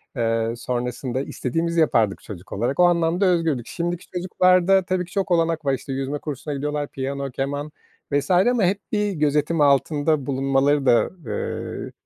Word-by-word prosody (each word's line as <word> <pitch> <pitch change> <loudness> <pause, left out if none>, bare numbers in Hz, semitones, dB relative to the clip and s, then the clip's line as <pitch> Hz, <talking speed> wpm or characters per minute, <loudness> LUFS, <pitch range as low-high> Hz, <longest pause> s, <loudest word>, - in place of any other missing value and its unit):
eee, 115 -1 0
sonrasında 125 +1 -3
istediğimizi 165 +6 -2
yapardık 115 -10 +2
çocuk 95 -3 -10
olarak. 120 - -2
O - - +7
anlamda 175 +2 +2
özgürdük. 165 -9 +1
Şimdiki 175 0 -3
çocuklarda 185 +1 +3
tabii 185 -1 -1
ki 175 - -18
çok 195 -2 -2
olanak 165 -2 +1
var, 135 - +2
işte, 135 +1 -4
yüzme 135 +2 -3
kursuna 145 0 -5
gidiyorlar, 145 +1 -2
piyano, 135 0 -4
keman 145 +3 -3 0.4
vs. 145 +5 0
ama 205 +6 +3
hep 195 +3 +1
bir 210 -1 0
gözetim 150 0 +1
altında 145 +1 +2
bulunmaları 135 +1 +1
da, 120 -2 +5 0.2
ııı, 105 -2 -4
145 Hz, 155 wpm, -23 LUFS, 135-175 Hz, 0.4 s, O